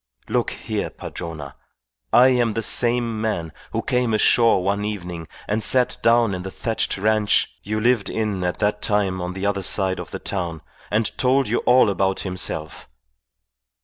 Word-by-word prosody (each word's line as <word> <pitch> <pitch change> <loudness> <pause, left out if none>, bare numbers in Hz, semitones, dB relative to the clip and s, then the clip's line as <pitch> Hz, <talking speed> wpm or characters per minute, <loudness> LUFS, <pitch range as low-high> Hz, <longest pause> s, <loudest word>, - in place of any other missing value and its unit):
Look - - 0
here, - - -4
Padrona, 75 -5 -7 0.6
I 125 +2 +7
am 120 -3 +2
the 115 +1 -2
same 120 -1 +2
man 85 -8 -2 0.2
who - - -2
came 125 -3 +1
ashore 115 -2 +4
one 100 +2 0
evening 90 -6 -5 0.2
and 105 +2 0
sat 125 +2 +2
down 115 -2 +3
in 90 - -4
the 95 - -6
thatched 110 +2 -2
ranche 105 +1 +2
you 110 +1 -3
lived 120 -1 +2
in 105 -4 -2
at 90 0 -1
that 105 0 0
time 100 -3 0
on 90 +1 -4
the 95 +1 -4
other 100 -1 0
side 95 0 0
of 90 - -7
the - - -5
town 85 -5 -4 0.3
and 110 +1 0
told 130 +1 +3
you 115 - +1
all 125 -1 +6
about 95 -1 0
himself. 90 -7 -4
105 Hz, 170 wpm, -22 LUFS, 95-115 Hz, 0.6 s, I